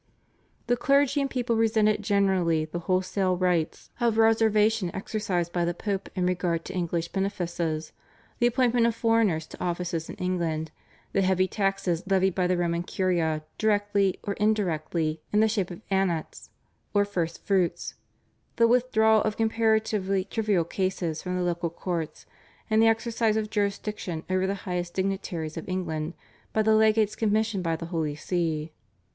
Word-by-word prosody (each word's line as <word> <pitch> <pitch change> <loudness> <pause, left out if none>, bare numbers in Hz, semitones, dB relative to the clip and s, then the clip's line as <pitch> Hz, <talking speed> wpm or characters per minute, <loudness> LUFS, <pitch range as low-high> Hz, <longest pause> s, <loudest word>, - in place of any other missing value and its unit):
The 245 - +2
clergy 280 +3 +3
and 275 - -1
people 245 -3 -1
resented 220 -1 +2
generally 190 -6 +2
the 155 +2 -5
wholesale 185 +1 0
rights 175 -3 -1
of 235 -2 +2
reservation 220 -3 +3
exercised 190 -4 -2
by 175 - +1
the 170 0 -1
Pope 195 0 -3
in 180 -2 0
regard 175 -2 0
to 190 - -6
English 170 -2 -2
benefices, 175 -5 -2 0.5
the 240 - +4
appointment 240 -1 +3
of 230 - 0
foreigners 225 -9 +2
to - - -9
offices 175 -2 -2
in - - -6
England, 165 -4 -2 0.4
the 195 - +2
heavy 185 0 +2
taxes 195 -4 0
levied 190 -1 +2
by 180 0 +1
the 180 0 +1
Roman 170 -1 0
Curia 170 -4 0 0.2
directly 205 -3 +2
or 200 - -2
indirectly 165 -6 0
in 210 - +3
the 220 - +5
shape 205 -4 -1
of 175 +2 -9
Annats 190 -5 -1 0.5
or 205 0 +4
First 170 -5 -3
Fruits, 190 -4 0 0.6
the 230 - +5
withdrawal 220 -3 +4
of 215 -1 -1
comparatively 220 -4 +1
trivial 205 -4 +1
cases 175 -2 -2
from 180 0 -3
the 180 - 0
local 170 -1 -1
courts, 165 -2 -4 0.5
and 220 0 +5
the 225 - +6
exercise 225 -1 +1
of 215 -1 -2
jurisdiction 200 -5 -2
over 185 0 +1
the 200 - -1
highest 175 -1 -3
dignitaries 190 -5 -2
of 165 - -6
England 165 -3 -3 0.4
by 220 - +2
the 220 0 +4
legates 215 -1 +3
commissioned 215 -2 0
by 165 -1 0
the 165 - -6
Holy 155 -3 -1
See. 160 -1 -2
190 Hz, 155 wpm, -27 LUFS, 170-215 Hz, 0.6 s, the